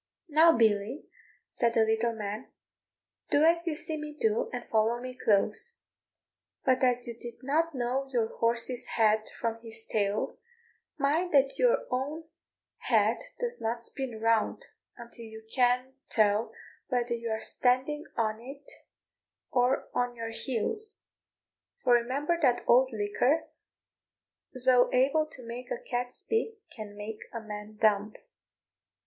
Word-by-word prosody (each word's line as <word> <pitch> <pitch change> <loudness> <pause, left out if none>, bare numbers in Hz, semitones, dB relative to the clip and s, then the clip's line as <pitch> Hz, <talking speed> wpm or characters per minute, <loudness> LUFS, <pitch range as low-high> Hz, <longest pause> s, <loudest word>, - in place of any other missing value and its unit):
"Now, 320 0 +6
Billy," 220 +3 +2 0.5
said 235 -1 +1
the 225 - +5
little 225 +1 +1
man, 215 +3 -5 0.8
"do 290 - +4
as 335 +2 +4
you 320 - 0
see 310 +1 -2
me 300 0 -7
do, 220 0 +1
and 245 -1 -6
follow 225 +2 +2
me 255 +1 -6
close; 220 - +2 0.9
but 260 -1 +3
as 250 -1 +3
you 235 - -5
did 240 +2 -10
not 310 +3 +1
know 255 +2 -1
your 230 -3 0
horse's 235 +1 +1
head 215 -1 +3
from 230 -1 -2
his 225 -1 -7
tail, 205 -1 -1 0.6
mind 315 +6 +1
that 275 0 +3
your - - +3
own 285 +6 -2 0.5
head - - +2 0.2
does 485 0 -3
not 230 +1 -2
spin 250 -3 -5
round 225 -1 +1 0.3
until 235 0 -11
you 220 0 -11
can't 250 +1 +2 0.2
tell 215 0 +3 0.4
whether 245 -2 0
you 235 0 -3
are 220 0 -1
standing 260 +7 0
on 220 -1 0
it 275 +3 -10 0.8
or 250 +1 +2
on 245 0 0
your 230 -1 -5
heels: 415 - -3 0.9
for 245 - +4
remember 275 +8 +1
that 250 -5 +3
old 260 +2 +5
liquor, 225 +8 +1 1.2
though 250 -1 +5
able 280 +5 +3
to 255 -5 -12
make 245 +2 -7
a - - -2
cat 245 0 -3
speak, 450 - -2 0.2
can 205 -2 -8
make 210 +1 -6
a 230 - -4
man 210 -1 -8
dumb." 210 -1 +2
245 Hz, 140 wpm, -29 LUFS, 225-275 Hz, 1.2 s, Now